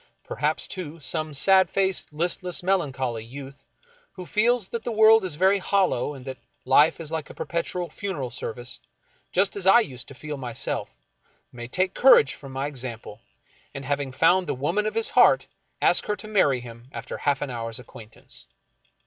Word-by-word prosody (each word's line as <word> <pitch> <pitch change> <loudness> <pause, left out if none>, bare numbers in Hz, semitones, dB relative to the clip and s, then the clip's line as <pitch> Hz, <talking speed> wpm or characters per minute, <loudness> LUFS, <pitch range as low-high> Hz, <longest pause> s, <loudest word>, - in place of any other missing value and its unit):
Perhaps, 150 +6 -2
too, 170 -4 -7
some 155 +2 -3
sad 190 +7 +4
faced, 190 -3 0
listless, 175 +3 -1
melancholy 135 - -1
youth, 135 +3 -10 0.5
who 185 - -9
feels 225 +1 +1
that 230 -1 -4
the 240 - -3
world 220 0 +6
is 180 -5 -3
very 190 +4 +3
hollow, 185 -8 +1
and 130 -1 -11
that 130 -1 -7 0.3
life 150 +5 +4
is 160 -2 -7
like 160 -3 -4
a - - -11
perpetual 175 +1 -3
funeral 155 -7 -5
service, 120 +1 -6 0.5
just 190 +2 +1
as 195 -2 -3
I 195 +5 +8
used 130 - -7
to 135 - -11
feel 150 +2 -6
myself, 125 -3 -3 0.6
may 120 -1 -8
take 185 +8 0
courage 245 - +6
from 135 -2 -11
my 135 +1 -3
example, 120 -6 -7 0.5
and 135 0 -6
having 140 -1 -2
found 175 +7 +3
the - - -1
woman 170 +11 -1
of 215 - -4
his 225 0 +1
heart, - - +5 0.4
ask - - +3
her 210 - 0
to 205 +1 -11
marry 145 - +2
him 120 0 -12
after - - -7
half 145 -1 0
an 140 - -5
hour's 115 -1 -4
acquaintance. 115 -3 -12
150 Hz, 175 wpm, -25 LUFS, 130-190 Hz, 0.6 s, I